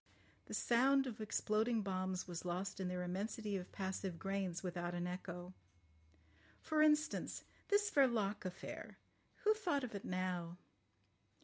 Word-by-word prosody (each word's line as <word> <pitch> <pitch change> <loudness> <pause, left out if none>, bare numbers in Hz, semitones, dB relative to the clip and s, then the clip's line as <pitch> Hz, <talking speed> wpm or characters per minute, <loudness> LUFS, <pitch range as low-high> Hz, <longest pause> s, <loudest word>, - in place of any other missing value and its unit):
The - - -4
sound 270 +3 +4
of 230 -3 -5
exploding 215 +1 +1
bombs 185 -1 -1
was 175 -2 -4
lost 180 +3 -2
in 190 - -1
their 180 0 -2
immensity 205 +3 -2
of 185 -1 -4
passive 190 -2 -3
grains 195 -1 -2
without 175 -1 -2
an 175 0 -1
echo. 180 0 -5 1.1
For 310 -1 +1
instance, 305 0 +3 0.2
this 410 0 +3
Verloc 235 -8 +3
affair. 185 -2 -6 0.5
Who 430 - +6
thought 350 -11 0
of 245 - -4
it 200 - -4
now? 180 -2 -2
195 Hz, 135 wpm, -39 LUFS, 180-240 Hz, 1.1 s, Who